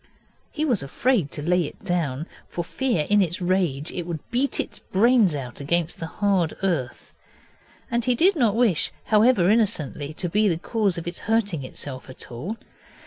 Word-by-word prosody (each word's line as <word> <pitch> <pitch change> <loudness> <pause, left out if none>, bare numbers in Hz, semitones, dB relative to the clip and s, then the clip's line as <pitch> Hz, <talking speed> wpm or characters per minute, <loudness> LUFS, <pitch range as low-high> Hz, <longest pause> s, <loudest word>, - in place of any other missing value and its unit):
He 310 0 -1
was 245 -9 +1
afraid 185 - +1
to 150 - -5
lay 175 +1 +2
it - - -10
down, 160 -5 -1 0.2
for 175 - -3
fear 205 - -1
in 205 0 +4
its 175 -2 -1
rage 175 -6 0
it 175 -2 -5
should 165 -4 -6
beat 260 +4 +1
its - - -3
brains 215 -4 +3
out 125 -4 -6
against 170 +3 0
the 165 - -4
hard 190 -4 0
earth, 150 -11 -2 0.8
and 235 0 +1
he 250 0 +2
did 360 +10 +4
not 235 -8 +2
wish, 225 -9 +2 0.2
however 215 -4 +5
innocently, 160 - 0
to 180 - -2
be 210 +5 +2
the 170 -4 +2
cause 200 0 0
of 170 - -5
its 175 0 -5
hurting 205 -10 +1
itself 130 0 -5
at 130 - -8
all. 160 - -5
180 Hz, 180 wpm, -24 LUFS, 155-225 Hz, 0.8 s, however